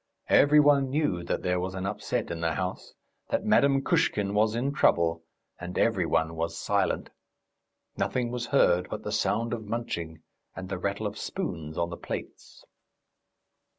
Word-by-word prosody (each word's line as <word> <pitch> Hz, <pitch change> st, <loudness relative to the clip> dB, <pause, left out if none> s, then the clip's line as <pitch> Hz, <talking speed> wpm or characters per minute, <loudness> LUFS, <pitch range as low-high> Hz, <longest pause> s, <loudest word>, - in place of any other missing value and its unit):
Every 150 Hz, +1 st, +6 dB
one 145 Hz, -2 st, +4 dB
knew 130 Hz, -, 0 dB
that -, -, -2 dB
there 90 Hz, 0 st, +1 dB
was 95 Hz, +1 st, -3 dB
an 95 Hz, 0 st, -3 dB
upset 105 Hz, -2 st, -2 dB
in 85 Hz, -1 st, -4 dB
the 85 Hz, -1 st, 0 dB
house, 90 Hz, 0 st, -4 dB, 0.3 s
that -, -, -1 dB
Madame 135 Hz, -1 st, +4 dB
Kushkin 105 Hz, -, +1 dB
was 110 Hz, +2 st, +2 dB
in 135 Hz, +4 st, -1 dB
trouble, 85 Hz, -, +2 dB, 0.4 s
and 90 Hz, +1 st, -6 dB
every 95 Hz, -7 st, +2 dB
one 80 Hz, 0 st, +1 dB
was 85 Hz, +1 st, -3 dB
silent. 100 Hz, +2 st, 0 dB, 0.9 s
Nothing 120 Hz, -2 st, -1 dB
was 120 Hz, -1 st, -3 dB
heard 90 Hz, -10 st, +3 dB
but -, -, -5 dB
the -, -, -4 dB
sound 115 Hz, +1 st, 0 dB
of 110 Hz, -2 st, -4 dB
munching 85 Hz, -9 st, -4 dB, 0.3 s
and 95 Hz, -1 st, -7 dB
the 95 Hz, -1 st, -3 dB
rattle 100 Hz, +3 st, -2 dB
of 105 Hz, +1 st, -4 dB
spoons 80 Hz, -, -4 dB
on 85 Hz, 0 st, -1 dB
the 85 Hz, -, -5 dB
plates. -, -, -8 dB
100 Hz, 165 wpm, -28 LUFS, 85-120 Hz, 0.9 s, Every